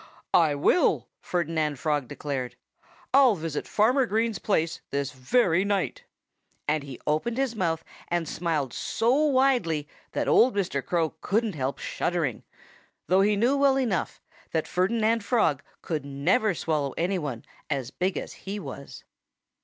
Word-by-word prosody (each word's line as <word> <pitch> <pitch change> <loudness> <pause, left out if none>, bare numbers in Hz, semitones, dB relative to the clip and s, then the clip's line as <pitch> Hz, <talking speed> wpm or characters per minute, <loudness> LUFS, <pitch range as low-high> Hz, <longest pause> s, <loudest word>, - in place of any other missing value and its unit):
"I 155 -4 +4
will!" 145 - +2
Ferdinand 160 -4 -1
Frog 145 -1 -1
declared. 130 -4 -4 0.6
"I'll 265 -5 +6
visit 160 -3 -4
Farmer 250 +5 +3
Green's 225 0 0
place 165 -5 0
this 140 0 -2
very 165 - +2
night!" 200 -2 -1 0.6
And 150 0 +1
he 135 -3 -9
opened 155 +11 0
his 265 -3 0
mouth 165 -5 -1 0.2
and 175 -2 -1
smiled 155 -7 -1
so 230 +2 +1
widely 260 - +2 0.3
that - - -1
old 245 -2 +5
Mr. 175 -9 -1
Crow 165 -3 0
couldn't 215 +1 0
help 135 -2 -2
shuddering 165 -9 -2 0.6
though 185 +2 +4
he 205 +1 +3
knew 240 +7 +3
well 275 -1 +4
enough 230 -10 -1 0.3
that 160 -1 0
Ferdinand 220 +4 +1
Frog 200 - +2 0.2
could 155 -4 -2
never 170 - +1
swallow 150 -4 -1
anyone 165 -9 -2 0.2
as 135 -4 -2
big 185 +5 -1
as - - -5
he 200 +2 -6
was. 140 -4 -9
175 Hz, 140 wpm, -26 LUFS, 145-220 Hz, 0.6 s, I'll